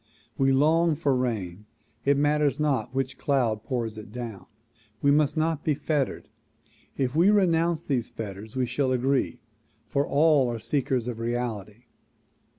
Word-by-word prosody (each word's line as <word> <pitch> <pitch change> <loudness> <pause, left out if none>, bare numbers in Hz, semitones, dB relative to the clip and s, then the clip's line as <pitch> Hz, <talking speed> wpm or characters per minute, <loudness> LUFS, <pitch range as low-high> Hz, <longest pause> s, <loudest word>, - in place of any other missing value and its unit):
We 135 -1 +2
long 160 +4 +3
for 140 -3 +1
rain 105 -6 -3 0.4
it 140 0 +4
matters 150 0 +2
not 145 -4 0
which 130 0 -3
cloud 120 -7 0
pours 115 -5 -3
it 105 -1 -11
down. 115 -6 -7 0.5
We 140 - +3
must 150 +1 +2
not 160 -1 0
be 150 - +1
fettered. 145 -2 -2 0.7
If 130 0 -1
we 170 +5 +5
renounce 170 -5 +2
these 125 -5 -1
fetters 105 +1 -8
we 130 -1 +1
shall 130 +2 -1
agree, 130 0 0 0.4
for 140 0 -1
all 145 -3 +4
are 120 - -3
seekers 125 0 -1
of 120 -2 -4
reality. 115 -2 -4
135 Hz, 150 wpm, -26 LUFS, 120-150 Hz, 0.7 s, we